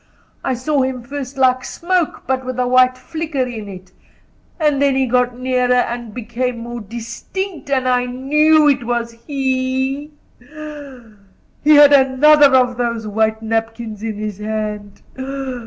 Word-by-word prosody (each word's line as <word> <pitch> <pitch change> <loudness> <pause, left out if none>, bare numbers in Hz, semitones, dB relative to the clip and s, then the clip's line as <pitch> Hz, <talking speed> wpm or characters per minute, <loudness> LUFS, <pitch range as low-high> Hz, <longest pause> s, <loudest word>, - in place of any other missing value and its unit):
I 260 - -1
saw 275 +3 0
him 260 -2 -2
first 275 +1 -7
like 255 -1 +3
smoke, 350 +3 -2
but 260 0 -1
with 255 -1 -5
a 250 - +1
white 255 0 +4
flicker 315 0 -3
in 230 -4 -6
it; 185 -1 -11 0.7
and 295 -3 +1
then 280 -1 +3
he 265 0 +2
got 250 0 +1
nearer 250 -1 +1
and 240 -2 -1
became 240 +2 -3
more 240 0 -7
distinct, 240 - -6
and 260 -2 +1
I 250 0 +2
knew 300 +5 +3
it 275 -3 +2
was 235 0 -2 0.2
he; 265 +1 -1 0.3
and 280 -5 -11 0.5
he 300 +1 +6
had 290 0 +8
another 280 +2 +6
of 250 -1 +3
those 235 -2 -2
white 220 +1 0
napkins 225 -1 -3
in 220 -1 -4
his 210 -1 -5
hand. 210 -1 -5
255 Hz, 150 wpm, -18 LUFS, 235-280 Hz, 0.7 s, had